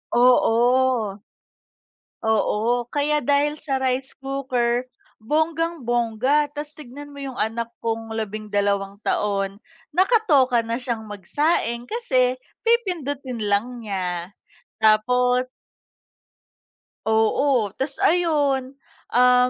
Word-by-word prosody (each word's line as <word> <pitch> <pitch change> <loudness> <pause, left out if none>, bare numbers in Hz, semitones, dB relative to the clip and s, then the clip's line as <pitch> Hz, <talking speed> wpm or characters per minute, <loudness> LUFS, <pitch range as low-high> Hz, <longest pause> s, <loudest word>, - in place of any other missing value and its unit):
Oo. 245 -3 +3 1.0
Oo, 220 +2 +1
kaya 295 +1 +2
dahil 290 +3 +1
sa 275 -3 -1
rice 260 +1 0 0.2
cooker 255 -3 -1 0.4
bonggang-bongga, 290 -3 0
tas 295 +1 -6
tignan 290 0 -10
mo - - -10
yung 265 -2 -6
anak 230 +2 -2
kong 225 0 -3
labing 215 -1 -5
dalawang 200 -1 0
taon, 200 0 -1 0.3
nakatoka 295 - +3
na 235 +2 -3
siyang 230 -3 -3
magsaing 235 - -1
kasi 255 - +1 0.3
pipindutin 285 - 0
lang 225 +5 0
niya. 185 -2 -4 0.5
Tapos 250 +4 +3 1.6
Oo, 220 +1 +2
tas 270 +3 -3
ayun, 290 -6 +2 0.4
um, 250 0 +5
250 Hz, 90 wpm, -23 LUFS, 220-285 Hz, 1.6 s, um